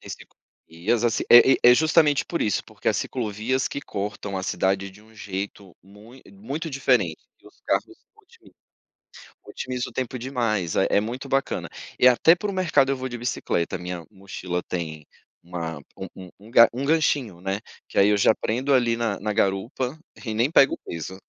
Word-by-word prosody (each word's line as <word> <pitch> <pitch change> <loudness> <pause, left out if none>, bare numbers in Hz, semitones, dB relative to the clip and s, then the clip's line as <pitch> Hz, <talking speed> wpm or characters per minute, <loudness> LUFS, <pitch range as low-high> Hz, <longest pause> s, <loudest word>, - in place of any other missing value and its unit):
Tem - - -11
ciclovias, 100 +9 -5
assim 115 -2 +1
é 120 +2 +8
é - - +8
justamente 155 -1 +3
por 170 - -2
isso, 105 - 0
porque - - -4
as - - +1
ciclovias 120 +2 -2
que 140 - -5
cortam 100 -3 -5
a 95 - -3
cidade 95 +1 -1
de 100 +2 -18
um 110 +1 -21
jeito 100 -2 -7
muito 105 +7 -16
muito 170 -6 -6
diferente, 125 - +1 0.2
e - - -21
os - - -19
carros - - +1 0.3
otimiza - - -22 0.9
Otimiza 125 -1 -5
o - - -18
tempo 130 -1 -3
demais, 115 -9 -1
eh, 95 - +3
é - - +4
muito 125 +5 -6
bacana. 135 0 -1 0.3
E 125 - +7
até 145 +7 +6
para 205 +3 -4
o - - -7
mercado 155 -7 +2
eu 135 - -1
vou 130 - -4
de 120 - -6
bicicleta, 105 -7 -2
a - - -16
minha 90 -1 -6
mochila 95 -3 -5
tem 80 -4 -5 0.4
uma 85 -2 -5 0.2
um - - -6 0.2
um - - -13
um 105 +3 -15
ga 115 0 +7
um 130 +3 -3
ganchinho, 140 - +1
né, 95 +2 -2 0.3
que - - -9
aí 100 +1 +5
eu 105 - +3
já 100 - +4
prendo 130 +5 -1
ali 120 -3 +3
na 115 -4 -2
na 105 +1 -2
garupa, 115 +9 -1 0.3
e 110 - -3
nem 120 +6 +1
pego 140 -4 +5
peso. 85 +3 -6
110 Hz, 190 wpm, -24 LUFS, 95-130 Hz, 0.9 s, é